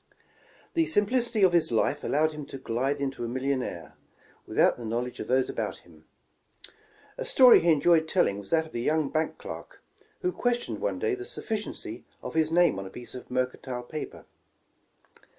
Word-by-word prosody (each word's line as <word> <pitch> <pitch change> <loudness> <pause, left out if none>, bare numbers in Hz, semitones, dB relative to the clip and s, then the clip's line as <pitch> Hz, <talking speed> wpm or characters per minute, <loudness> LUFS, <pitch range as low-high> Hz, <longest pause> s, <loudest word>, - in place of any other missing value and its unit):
Tlie 330 -1 +3
simplicity 235 -2 +1
of 185 -2 +5
his 170 -6 +3
life 140 +6 +1
allowed 155 +2 +2
him 150 -1 -7
to - - -7
glide 135 +3 -1
into 135 -3 -3
a - - -2
millionaire, 130 -8 -3 0.5
without - - +3
the 120 - -9
knowledge 120 +2 -3
of - - -5
those 130 0 +2
about - - -4
him. 80 -3 -19 1.1
''A - - -3
story 255 -2 +8
he 170 - +1
enjoyed 160 +1 +4
telling 160 - +2
was 100 - -10
that 160 -1 +2
of 160 - -15
a 120 - -2
young 150 +3 +1
bank 155 0 -1
clerk, - - -9 0.4
who 365 - +1
questioned 245 -6 -1
one - - -1
day 445 -2 0
the 380 0 -4
sufficiency 220 - -5 0.2
of - - -5
his 160 -1 +2
name 170 - +3
on 95 - -6
a - - -9
piece 120 +3 -10
of 125 - -9
mercantile 125 0 -2
paper. 155 +5 -7
150 Hz, 180 wpm, -28 LUFS, 125-180 Hz, 1.1 s, story